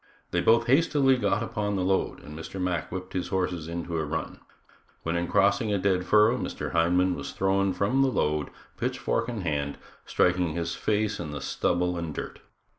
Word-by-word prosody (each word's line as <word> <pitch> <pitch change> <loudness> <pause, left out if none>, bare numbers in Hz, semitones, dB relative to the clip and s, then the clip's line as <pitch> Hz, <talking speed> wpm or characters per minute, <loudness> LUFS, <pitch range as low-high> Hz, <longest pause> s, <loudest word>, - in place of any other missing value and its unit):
They 90 - +1
both 115 +5 +4
hastily 135 0 +4
got 115 -2 +1
upon 105 -2 -2
the 95 - 0
load 95 +1 0
and 75 - -10
Mr. 80 +4 -7
Mack 90 -3 -1
whipped 95 0 -6
his 90 - -2
horses 90 -4 -2
into 85 0 -4
a - - 0
run, 80 +2 -4 0.6
when 80 +1 -1
in 85 0 0
crossing 100 +4 +2
a 100 - +2
dead 95 -1 +1
furrow 105 +5 +5
Mr. - - -4
Hindman 90 +2 +3
was 70 -5 -6
thrown 95 0 +1
from 100 +9 +1
the 135 - +4
load, 75 - 0 0.3
pitchfork 115 - -1
in 115 -4 -4
hand, 70 -4 -2 0.3
striking 90 0 +2
upon 80 -1 -3
his 85 -1 -2
face 105 0 0
in 85 -3 -4
the 75 -1 -5
stubble 90 +4 0
and 80 -3 -5
dirt. - - -6
90 Hz, 190 wpm, -27 LUFS, 85-105 Hz, 0.6 s, furrow